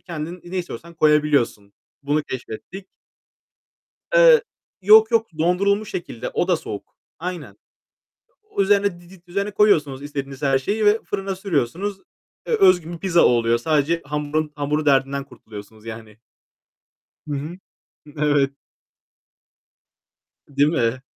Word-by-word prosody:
kendin 170 Hz, +1 st, -7 dB
ne 180 Hz, +2 st, -4 dB
istiyorsan 170 Hz, -1 st, -7 dB
koyabiliyorsun. 150 Hz, -10 st, +2 dB, 0.3 s
Bunu 145 Hz, +2 st, 0 dB
keşfettik. 130 Hz, -, -8 dB, 1.3 s
Eee, -, -, +7 dB, 0.4 s
yok 215 Hz, +3 st, +7 dB
yok 225 Hz, -1 st, +2 dB
dondurulmuş 200 Hz, +5 st, +1 dB
şekilde, 145 Hz, -9 st, -5 dB
o -, -, -1 dB
da -, -, +3 dB
soğuk. -, -, -8 dB, 0.2 s
Aynen. 160 Hz, -, -6 dB, 0.9 s
O 200 Hz, -, -1 dB
üzerine 200 Hz, -2 st, +2 dB
didit 180 Hz, 0 st, -18 dB
üzerine 200 Hz, +3 st, -2 dB
koyuyorsunuz 150 Hz, -10 st, +2 dB, 0.4 s
her 135 Hz, -2 st, +3 dB
şeyi 210 Hz, +10 st, -1 dB
ve 210 Hz, +2 st, +4 dB
fırına 195 Hz, -1 st, -3 dB
sürüyorsunuz. 190 Hz, -, -2 dB, 0.5 s
E, -, -, -5 dB
özgün 180 Hz, -, +4 dB
bir -, -, -6 dB
pizza 175 Hz, -2 st, +3 dB
oluyor. 115 Hz, -1 st, +3 dB
Sadece 155 Hz, +5 st, 0 dB
hamurun, 150 Hz, +1 st, -2 dB
hamur 150 Hz, +1 st, -1 dB
derdinden 140 Hz, 0 st, +2 dB
kurtuluyorsunuz 110 Hz, -1 st, -13 dB
yani. 110 Hz, -1 st, -9 dB, 1.1 s
Hı 145 Hz, -, -2 dB
hı. 155 Hz, +6 st, -6 dB, 0.6 s
Evet. 145 Hz, -2 st, +2 dB, 2.0 s
Değil 145 Hz, +1 st, +2 dB
mi? 130 Hz, -4 st, 0 dB
155 Hz, 115 wpm, -22 LUFS, 140-190 Hz, 2.0 s, Eee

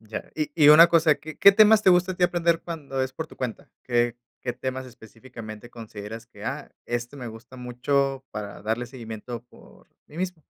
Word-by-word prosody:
Ya. 110 Hz, -1 st, -8 dB
Y 155 Hz, -1 st, -2 dB
y 150 Hz, -3 st, +6 dB
una 160 Hz, +3 st, +9 dB
cosa, 165 Hz, -2 st, +4 dB
¿qué 155 Hz, -1 st, -10 dB
qué 200 Hz, -, +8 dB
temas 215 Hz, +1 st, +6 dB
te 190 Hz, -, +6 dB
gusta 180 Hz, +1 st, +3 dB
a -, -, -7 dB
ti 180 Hz, -, +3 dB
aprender 170 Hz, -1 st, +1 dB
cuando 145 Hz, -6 st, -5 dB
es 130 Hz, 0 st, -3 dB
por 160 Hz, +4 st, -5 dB
tu -, -, -16 dB
cuenta? 125 Hz, -3 st, -5 dB
¿Qué 120 Hz, -1 st, +1 dB, 0.3 s
qué 125 Hz, -, -2 dB
temas, 130 Hz, +1 st, -5 dB
específicamente, 115 Hz, -1 st, -11 dB
consideras 110 Hz, 0 st, -9 dB
que: 120 Hz, -, -13 dB
"Ah, -, -, -5 dB, 0.2 s
este 120 Hz, +3 st, -4 dB
me 125 Hz, -3 st, -6 dB
gusta 115 Hz, +3 st, -12 dB
mucho 135 Hz, +2 st, -1 dB
para 105 Hz, -1 st, -7 dB
darle 115 Hz, +3 st, -2 dB
seguimiento 120 Hz, -1 st, -8 dB
por -, -, -19 dB, 0.2 s
mí 150 Hz, -, -15 dB
mismo"? 180 Hz, -3 st, -3 dB
130 Hz, 200 wpm, -25 LUFS, 120-160 Hz, 0.3 s, una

